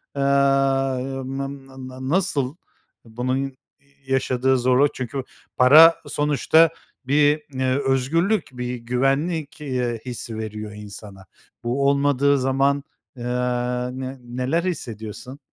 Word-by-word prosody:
aaa, 135 -1 +2 0.3
n 135 +1 -5
n 135 -1 -11 0.2
n 130 +1 -7
nasıl, 150 -6 0 0.5
bunun 125 +3 -2
ya 135 0 -2 0.6
yaşadığı 130 0 +1
zorluk 130 +3 +3
çünkü 130 +1 -4 0.3
para 155 +6 +8
sonuçta 150 +2 +3 0.4
bir, 145 +2 +3
ııı, 130 +1 +1
özgürlük, 165 +11 +1
bir 125 0 -3
güvenlik, 135 +7 -1
iii, 125 -5 -2
hissi 115 -2 -6
veriyor 105 -1 -6
insana. 100 -2 -10 0.4
Bu 135 +4 0
olmadığı 140 0 +2
zaman, 135 +2 +1 0.3
ııı, 125 +1 -2
ne 130 +1 -5
neler 125 +7 -1
hissediyorsun? 125 - -5
130 Hz, 110 wpm, -22 LUFS, 125-140 Hz, 0.6 s, para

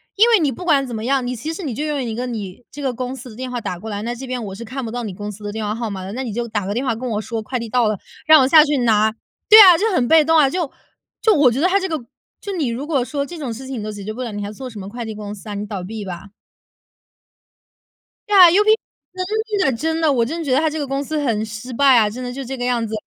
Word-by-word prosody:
因 440 +4 +5
为 450 -4 +5
你 285 -3 +2
不 350 +9 -8
管 280 -5 +3
怎 245 - -7
么 220 +1 -4
样， 270 -1 +1
你 250 0 -3
其 310 +8 -5
实 365 - -7
你 265 -6 -3
就 295 +7 -3
用 295 -3 -2
一 230 -2 -4
个 245 - -3
你 215 -1 -6
这 290 - -8
个 265 -3 -1
公 255 +2 -4
司 255 0 -10
的 215 - -12
电 255 +1 -5
话 245 -1 -4
打 180 -1 -4
过 220 - -7
来， 205 0 -4
那 235 +2 -3
这 260 +2 -8
边 250 -2 -3
我 195 - -6
是 235 +3 -8
看 265 +3 -5
不 225 - -5
到 245 0 -4
你 205 -4 -5
公 205 +2 -6
司 210 +1 -12
的 205 - -4
电 220 0 -4
话 210 - -1
号 230 -1 -4
码 190 -2 -6
的， 190 - -6
那 260 +2 -3
你 225 -5 -5
就 240 +1 -3
打 210 -4 -3
个 200 - -2
电 250 +4 -2
话 245 - +1
跟 250 +2 -5
我 215 -1 -1
说 225 0 -4
快 250 +4 -4
递 230 - -6
到 245 -1 +2
了， 215 - 0 0.3
让 310 -3 +8
我 260 - +3
下 305 +2 +8
去 290 -1 0
拿。 220 -2 +3 0.4
对 435 +1 +11
啊， 360 -4 +9
就 445 +3 +1
很 250 -9 +1
被 320 -1 +6
动 325 +1 +4
啊。 280 -3 +5
就 345 -2 -2 0.5
就 440 - +4
我 285 -5 +5
觉 255 - -2
得 365 - +4
他 395 +2 +2
这 380 - -2
个 320 - -2 0.4
就 405 - -5
你 315 -8 -1
如 240 +5 -3
果 285 -5 0
说 280 0 -3
这 340 +3 -9
种 265 -6 -4
事 260 +4 -9
情 260 -4 -5
你 - - -5
都 215 - -4
解 205 -1 -8
决 215 +2 -5
不 255 - -7
了， 235 - -5
你 205 0 -4
还 205 - -5
做 255 +4 -8
什 220 - -11
么 195 +1 -7
快 235 +1 -6
递 220 -1 -6
公 210 -1 -7
司 210 +1 -12
啊？ - - -4
你 205 +1 -4
倒 200 -3 -5
闭 215 +2 -6
吧。 190 +2 -8 2.0
对 415 - +2
呀 360 -2 +10
，UP 415 +5 +3 0.5
那 370 0 -3
真 425 -6 0
的 230 - -4
真 320 +3 -1
的， 310 -2 +3
我 235 -3 +2
真 320 +8 -4
的 325 - -4
觉 265 - -1
得 260 - +4
它 315 - +2
这 310 +1 -4
个 285 - -3
公 275 +1 -2
司 310 +2 -3
很 225 -6 0
失 220 +3 -8
败 270 0 +5
啊， 215 -2 +4
真 250 +4 -7
的 245 - -4
就 270 +2 -6
这 265 +2 -5
个 245 - -4
样 240 -2 0
子。 220 - -7
250 Hz, 355 characters per minute, -20 LUFS, 220-295 Hz, 2.0 s, 对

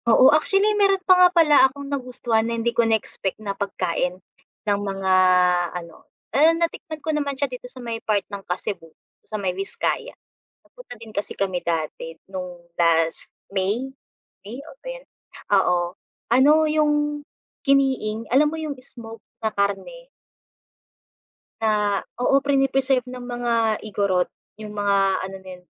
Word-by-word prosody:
Oo, 255 +5 +7
actually 390 +7 +3
meron 390 -1 +4
pa 370 - +7
nga 360 0 +7
pala 330 -4 +4
akong 280 +1 -9
nagustuhan 250 -4 -1
na 230 - -2
hindi 235 +1 0
ko 235 - +3
na-expect 220 -4 -1
na 205 -2 -4
pagkain 180 -2 -2 0.5
ng 205 -1 +1
mga 195 -1 -1 0.6
ano, 170 -2 -12 0.2
and 320 +3 +5
natikman 330 -1 -3
ko 315 - 0
naman 285 -2 -2
siya 280 - +1
dito 250 -2 -8
sa 260 - -18
may 230 -1 -4
part 210 -2 0
ng 200 - -5
Kasibu 180 -2 -5 0.3
sa 215 - -6
may 190 -3 -1
Viscaya. 195 - -3 0.5
Nagpunta - - -13
din 220 -1 -12
kasi 205 - -4
kami 190 -3 -1
dati 165 0 -3 0.2
no'ng 175 -2 -8
last 165 -1 +2 0.2
May, 210 +8 -1 0.5
May, 215 +5 -8
oh, - - -12
ba - - -12
yun, - - -8 0.5
oo, 190 -2 +4 0.6
ano 260 +4 +6
yung 305 -1 +2 0.7
Kiniing 265 -6 +1
alam 295 +3 +5
mo 320 - -5
yung 310 -2 -3
smoked 230 -4 -11 0.2
na 220 - 0
karne. 210 - -2 1.5
Na, 210 -2 +1 0.2
oo, 275 +3 +3
prine-preserve 270 -2 +2
ng 250 0 -8
mga 235 -3 -1
Igorot, 195 -4 +1 0.3
yung 215 -1 -8
mga 205 -1 +1 0.3
ano 195 - -8
na - - -9
yun, - - -30
230 Hz, 150 wpm, -23 LUFS, 200-280 Hz, 1.5 s, Oo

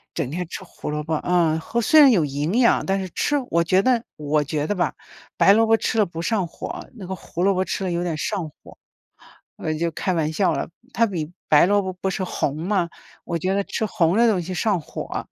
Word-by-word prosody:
整 130 - -2
天 175 +1 -3
吃 190 - -7
胡 180 - -8
萝 150 0 -2
卜， 160 +1 -1
呃， 165 -2 +1
和 235 +8 -2
虽 310 +8 +5
然 285 -3 +9
有 185 -10 +4
营 145 +4 -2
养， 235 - +4
但 195 0 +1
是 185 - -5
吃 290 - 0 0.2
我 170 - +3
觉 185 +3 +3
得 250 -1 +2
我 150 0 0
觉 150 0 -2
得 205 - 0
吧， 175 -7 0 0.4
白 - - +5
萝 225 +3 +5
卜 225 - +5
吃 225 +1 -1
了 210 - +4
不 165 -1 -6
上 195 -2 0
火， - - -7
那 195 -5 -9
个 190 - -4
胡 180 -1 -5
萝 195 - +4
卜 185 0 0
吃 195 - -3
了 180 - -1
有 170 +1 -1
点 170 -3 -2
上 170 -1 -2
火。 - - -18 0.8
我 155 - -2
就 170 +2 -1
开 185 - -1
玩 160 -2 0
笑 175 +1 +2
了， 140 - -3 0.2
它 230 - +3
比 165 -6 -4 0.2
白 150 0 +6
萝 205 +3 +3
卜 190 -1 -4
不 190 +1 -3
是 185 0 -2
红 145 -4 -2
吗？ 180 +1 0 0.3
我 170 - -3
觉 185 +4 -1
得 200 - +1
吃 220 +2 -2
红 180 -3 +1
的 235 - +5
东 190 -5 +1
西 185 - -6
上 195 -1 0
火。 - - -6
180 Hz, 265 characters per minute, -23 LUFS, 160-200 Hz, 0.8 s, 然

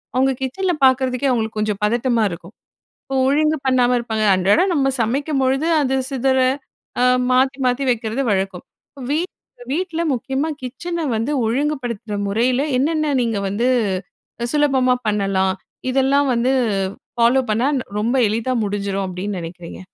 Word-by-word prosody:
அவங்க 265 +1 +3
கிச்சன 360 +8 -1
பாக்கறதுக்கே 260 0 +2
அவங்களுக்கு 220 -3 -1
கொஞ்சம் 210 -1 -1
பதட்டமா 235 +2 +1
இருக்கும். 170 +2 -9 0.5
அப்போ 270 - -5
ஒழுங்கு 305 +3 +2
பண்ணாம 250 -1 +3
இருப்பாங்க. 220 -2 -1
அன்றாடம் 205 - +3
நம்ம 275 -4 +2
சமைக்கும்பொழுது 270 +4 0
அது 265 -1 0 0.2
சிதற 265 0 +1 0.6
அ - - +4 0.3
மாத்தி 260 +1 +3
மாத்தி 250 +2 0
வைக்கிறது 225 +2 -2
வழக்கம். 190 -2 -2 0.5
வீட் 335 +5 -1 0.4
வீட்ல 335 +1 -2
முக்கியமா 265 +5 -2
கிச்சன 330 +6 -4
வந்து 225 +6 -1
ஒழுங்குபடுத்துற 245 -4 -2
முறையில 245 +6 +1 0.2
என்னென்ன 305 +2 +1
நீங்க 230 -3 -1
வந்து 205 +6 0 0.9
சுலபமா 270 -4 +3
பண்ணலாம்? 195 -2 +1 0.4
இதெல்லாம் 275 +2 +2
வந்து 245 +2 +1 0.6
ஃபாலோ 240 +3 +4
பண்ணா 230 +5 +1 0.3
ரொம்ப 230 +5 0
எளிதா 230 +4 -1
முடிஞ்சிரும் 200 -1 -2
அப்டின்னு 185 +1 -4
நினைக்கிறீங்க? 170 0 -9
250 Hz, 125 wpm, -20 LUFS, 215-275 Hz, 0.9 s, அ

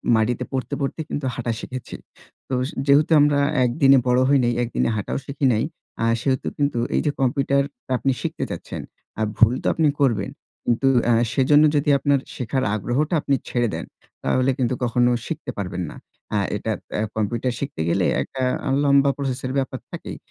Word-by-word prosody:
মাটিতে 110 +2 +1
পড়তে, 130 -2 -3
পড়তে 140 +3 -2
কিন্তু 145 - -3
হাঁটা 120 -1 -2
শিখেছি। 130 -1 -7 0.5
তো - - -3 0.3
যেহেতু 145 +3 +4
আমরা 145 -1 +4 0.3
একদিনে 135 +2 +5
বড় 125 0 +4
হই 140 - +5
নাই, 120 0 +2
একদিনে 120 -1 0
হাঁটাও 105 - -2
শিখি 140 0 -2
নাই। 110 - +1 0.4
আ - - +3 0.2
সেহেতু 130 0 0
কিন্তু 140 -4 0 0.2
এই - - +3
যে 150 - +2
কম্পিউটারটা 140 +1 0
আপনি 135 - +1
শিখতে - - -3
চাচ্ছেন। - - -6 0.4
আর 110 - +2
ভুল 115 +1 +6
তো - - 0
আপনি 160 -2 +2
করবেন। 125 -6 +1 0.3
কিন্তু 120 +3 +2 0.2
অ্যা 120 - +4 0.2
সেজন্য 145 +3 +5
যদি 145 0 +2
আপনার 140 0 +2 0.2
শেখার 130 +2 -1
আগ্রহটা 125 - -1
আপনি 140 - +1
ছেড়ে 120 -1 +1
দেন - - -5 0.4
তাহলে 130 +1 +2
কিন্তু 130 -2 0
কখনো 120 0 +3 0.2
শিখতে 155 -5 -4
পারবেন 90 -2 -3
না। - - -11 0.4
আ - - +3 0.2
এটা 110 +2 -2 0.3
আ - - +1
কম্পিউটার 115 +3 -1
শিখতে 140 - -4
গেলে 90 +1 +2 0.2
একটা 135 - -5 0.3
আ - - 0
লম্বা 140 0 +5
প্রসেস 135 -2 -2
এর 130 - -2
ব্যাপার 130 -1 -2
থাকেই। - - -7
130 Hz, 175 wpm, -22 LUFS, 120-140 Hz, 0.5 s, ভুল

